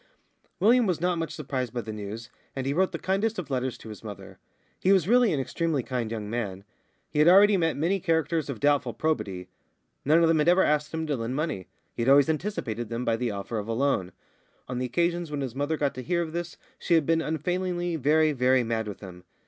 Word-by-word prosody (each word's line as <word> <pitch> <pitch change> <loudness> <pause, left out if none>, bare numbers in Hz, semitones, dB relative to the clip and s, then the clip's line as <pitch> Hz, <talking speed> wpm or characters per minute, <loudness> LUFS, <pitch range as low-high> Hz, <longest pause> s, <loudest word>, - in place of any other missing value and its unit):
William 230 +4 +4
was 180 -4 0
not 175 0 0
much 165 -2 -3
surprised 130 -5 -3
by 120 - -1
the 110 -1 -7
news, 105 +3 -7 0.2
and 135 -1 -3
he 140 - 0
wrote 185 +4 +2
the 170 - -3
kindest 200 +6 -1
of 170 -6 -5
letters 130 -1 -1
to 110 - -11
his 105 0 -10
mother. 100 -3 -9 0.4
He 190 - +2
was 190 -3 +4
really 245 0 +4
an 150 - 0
extremely 150 0 -1
kind 125 -3 -3
young 110 -2 -4
man. 105 -4 -4 0.5
He 150 - -1
had 150 - +5
already 200 +3 +7
met 165 -5 +1
many 175 +7 +1
characters 160 -2 0
of 130 -6 -4
doubtful 145 -5 +1
probity. 100 - -2 0.6
None 160 +4 +4
of - - +5
them 160 -1 +3
had 150 - +2
ever 180 +2 +5
asked 150 0 +1
him 160 0 -3
to 150 -2 -1
lend 115 +1 -3
money; 150 - -3 0.3
he - - -4
had 120 - +2
always 140 +2 +6
anticipated 145 - -3
them 120 +1 -3
by 115 - +2
the 120 +1 -2
offer 105 +2 -4
of 105 - -6
a 115 - -1
loan. 115 -7 0 0.6
On 125 -1 -3
the 125 - -1
occasions 170 +5 0
when 145 -1 -3
his 130 -4 -4
mother 145 +4 -1
got 145 -2 0
to 130 - -6
hear 170 +6 0
of 160 -1 -7
this 175 0 -4 0.2
she 170 - +2
had 160 -3 +3
been 165 +1 +2
unfailingly 175 +2 -2
very, 155 +1 +3
very 130 -2 +3
mad 115 -1 -2
with 100 - -7
him. 90 -3 -10
145 Hz, 235 wpm, -27 LUFS, 115-170 Hz, 0.6 s, already